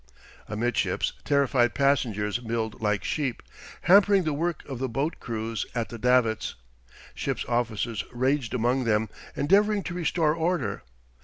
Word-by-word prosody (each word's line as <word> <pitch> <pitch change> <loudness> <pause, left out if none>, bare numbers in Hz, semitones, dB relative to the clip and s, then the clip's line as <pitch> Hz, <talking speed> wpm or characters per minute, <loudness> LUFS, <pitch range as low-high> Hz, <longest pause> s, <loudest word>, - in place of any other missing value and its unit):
Amidships 115 +3 0
terrified 135 -4 +2
passengers 120 -6 +1
milled 115 -2 -3
like 105 -2 0
sheep, 135 -6 -2 0.4
hampering 200 +1 +5
the 155 -2 -1
work 165 +2 -2
of 135 -4 -5
the 130 0 -1
boat 140 +7 -2
crews 115 -1 -3
at 115 -2 -1
the 115 - -8
davits. 125 -2 +2 0.6
Ship's - - -3
officers 115 -3 -1
raged 130 0 0
among 125 +2 +1
them, 110 -1 +1 0.3
endeavouring 200 +6 +3
to 175 - -5
restore 165 -3 +1
order. 160 - -1
125 Hz, 135 wpm, -26 LUFS, 115-150 Hz, 0.6 s, hampering